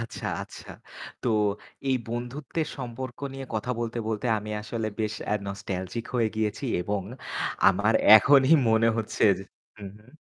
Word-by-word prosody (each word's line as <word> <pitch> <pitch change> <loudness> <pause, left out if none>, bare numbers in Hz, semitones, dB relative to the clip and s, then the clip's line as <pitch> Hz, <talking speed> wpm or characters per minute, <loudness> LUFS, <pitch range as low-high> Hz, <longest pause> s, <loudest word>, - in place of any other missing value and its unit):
আচ্ছা, 115 - -6 0.2
আচ্ছা। - - -11 0.5
তো - - 0 0.6
এই 130 - +3
বন্ধুত্বের 125 +6 -3
সম্পর্ক 125 -1 -6
নিয়ে 135 0 -7
কথা 110 +3 -2
বলতে, 115 0 -3
বলতে 110 +2 -2
আমি 105 +1 -7
আসলে 110 0 -3
বেশ 110 -1 -1 0.2
আ - - +3
নস্টালজিক 100 +2 -4
হয়ে 115 -3 +2
গিয়েছি 110 +4 -1 0.2
এবং 100 +2 -2 0.7
আমার 100 +4 +2 0.2
এখনই 135 +6 +6 0.2
মনে 110 +1 +4
হচ্ছে 110 -2 0
যে 95 - -8 0.3
হু, 105 - -9
হু। 105 - -22
115 Hz, 145 wpm, -27 LUFS, 105-125 Hz, 0.7 s, এখনই